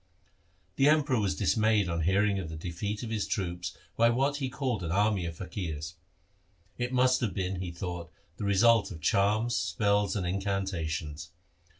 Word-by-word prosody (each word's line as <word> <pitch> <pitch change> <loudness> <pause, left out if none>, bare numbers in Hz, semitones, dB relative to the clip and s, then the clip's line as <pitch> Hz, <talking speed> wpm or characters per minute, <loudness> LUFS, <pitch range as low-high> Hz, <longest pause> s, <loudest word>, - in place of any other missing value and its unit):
The 140 +1 +5
Emperor 150 -5 +3
was 100 -3 0
dismayed 105 0 +2
on 85 -1 -1
hearing 100 +4 +2
of 85 -4 -5
the 80 - -6
defeat 90 +7 -4
of 115 - -5
his 110 -2 -1
troops 90 -3 -3 0.2
by 115 +1 +5
what 135 +4 +1
he 135 -3 -2
called 130 -5 -2
an 85 -2 -3
army 100 -2 +2
of 80 -1 -7
faqirs. 85 -5 -5 0.9
It 125 0 -1
must 130 0 +3
have 115 -6 -1
been, 95 -1 -2
he 90 - -3
thought, 85 -1 -6 0.3
the - - -5
result 110 +2 +4
of 85 -6 -8
charms, 105 +8 +2
spells, 100 +2 +1
and 95 -4 -1
incantations. 85 -5 -2
100 Hz, 170 wpm, -29 LUFS, 85-110 Hz, 0.9 s, The